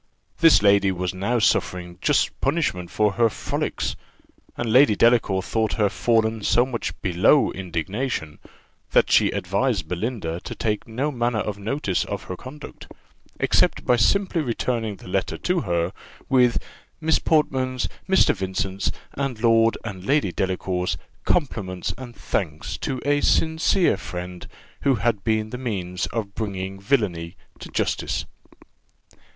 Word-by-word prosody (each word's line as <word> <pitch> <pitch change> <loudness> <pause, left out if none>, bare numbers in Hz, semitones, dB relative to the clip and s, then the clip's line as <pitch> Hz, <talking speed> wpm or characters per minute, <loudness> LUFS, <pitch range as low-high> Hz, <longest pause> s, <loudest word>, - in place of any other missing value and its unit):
This 165 -10 +6
lady 100 -1 +5
was 90 -1 -2
now 100 +6 0
suffering 90 -6 0
just 145 -2 +1
punishment 135 - 0
for 105 -1 +2
her 115 +2 +3
frolics, - - -3 0.6
and 115 -2 -1
Lady 130 -4 +6
Delacour 110 -5 +3
thought 110 +1 0
her 105 -2 +2
fallen 110 +3 +1
so 120 +4 +3
much 125 -3 -4
below 95 - +4
indignation, 95 - -3 0.5
that - - +4
she - - +5
advised 100 +3 -1
Belinda 90 -3 -3
to - - -6
take 105 -2 -2
no 130 +7 -2
manner 120 -3 0
of 105 -1 -4
notice 105 -3 -1
of - - -5
her 90 - -6
conduct, 135 +8 -10 0.5
except - - +2
by 125 - +4
simply 175 - +2
returning 115 -4 -2
the - - -14
letter 95 +1 -1
to 180 -1 0
her, 85 - -1 0.3
with 125 -3 +4 0.4
"Miss 160 0 +2
Portman's, 130 -5 +1 0.2
Mr. 190 - +5
Vincent's, 95 0 -2 0.2
and 135 -4 -3
Lord 115 0 +4
and 95 -5 -6
Lady 140 -4 +2
Delacour's, 90 -2 -1 0.3
compliments 100 - -1
and 120 -2 -10
thanks 80 -6 -3
to 130 - -3
a 145 0 +2
sincere 160 - +3
friend, 90 -1 -7 0.3
who 135 -2 +3
had 110 -3 0
been 110 -1 0
the 125 - -5
means 90 -7 -3
of 105 -3 -4
bringing 95 -3 -4
villany 100 -7 -1 0.2
to - - -9
justice." - - -1
110 Hz, 140 wpm, -23 LUFS, 95-130 Hz, 0.6 s, This